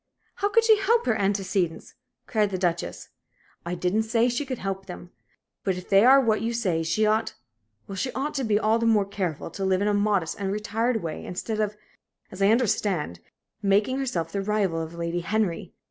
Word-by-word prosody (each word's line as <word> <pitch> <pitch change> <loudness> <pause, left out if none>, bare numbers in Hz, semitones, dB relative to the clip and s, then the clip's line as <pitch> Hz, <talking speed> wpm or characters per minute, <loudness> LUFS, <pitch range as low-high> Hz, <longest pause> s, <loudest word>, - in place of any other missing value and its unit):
"How 405 - +1
could 460 +2 +4
she 440 -2 +5
help 460 +4 +2
her 220 - +2
antecedents?" 195 -4 -1 0.3
cried 215 -3 +1
the 190 - -3
Duchess. 175 -2 -2 0.5
"I 175 +1 -3
didn't 180 +5 +1
say 230 +2 +2
she 245 +4 -2
could 260 -2 -3
help 195 -1 -4
them. 175 -1 -9 0.5
But 190 -2 0
if 180 - -9
they 195 0 +6
are 265 +3 +8
what 225 -5 +1
you 230 +1 -1
say, 185 -8 0
she 165 +7 +1
ought 215 +1 +1 0.5
well, 195 - -7
she 225 +7 -2
ought 280 +3 -2
to 275 -3 -2
be 215 -3 +2
all 220 +2 +2
the 230 - +1
more 215 -3 +4
careful 185 -5 -4
to 195 - -5
live 190 -1 +2
in 205 - 0
a 210 - +2
modest 205 -5 0
and 195 -1 -2
retired 225 +2 -1
way, 160 -2 -5
instead 215 +4 -4
of, 210 -1 -1 0.5
as 190 - -8
I 195 - +5
understand, 200 - +1 0.4
making 205 +6 +2
herself 175 - -2
the 200 - -2
rival 195 -5 0
of 160 +1 -7
Lady 170 +1 -2
Henry. 185 0 -1
205 Hz, 205 wpm, -25 LUFS, 180-225 Hz, 0.5 s, are